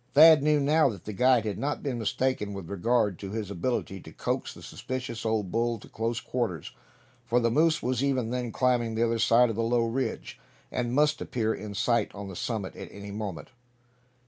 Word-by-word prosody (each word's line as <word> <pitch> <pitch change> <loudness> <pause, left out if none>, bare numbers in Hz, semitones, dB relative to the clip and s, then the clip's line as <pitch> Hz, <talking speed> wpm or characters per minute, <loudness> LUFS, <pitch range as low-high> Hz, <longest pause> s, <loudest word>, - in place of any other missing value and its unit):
Thad 155 0 +9
knew 150 0 +3
now 150 +1 +4
that 105 - -8
the 105 - -5
guide 125 +1 +3
had 105 -2 -3
not 145 +2 -2
been 130 -5 -2
mistaken 110 -2 -1
with 95 -3 -7
regard 105 0 +1
to 100 - -6
his 105 -1 -4
ability 95 0 -2
to - - -12
coax - - -2
the - - -13
suspicious 125 -3 -5
old 105 -4 -1
bull 115 +1 0
to - - -14
close 115 +2 -2
quarters; 115 - -3 0.5
for 120 0 +2
the 115 -1 +1
moose 155 +5 +3
was 125 +1 0
even 130 -4 0
then 125 -2 -2
climbing 120 -2 +1
the 115 +1 +2
other 115 0 0
side 115 +1 +4
of - - -5
the 115 - -1
low 115 0 +2
ridge, 125 +3 -3 0.3
and 120 0 -2
must 150 0 +3
appear 110 -2 -1
in 105 -1 -7
sight 120 +2 +1
on 100 0 -7
the 95 - -8
summit 105 -1 -3
at - - -8
any 100 0 -9
moment! 100 -4 -5
115 Hz, 205 wpm, -28 LUFS, 105-130 Hz, 0.5 s, Thad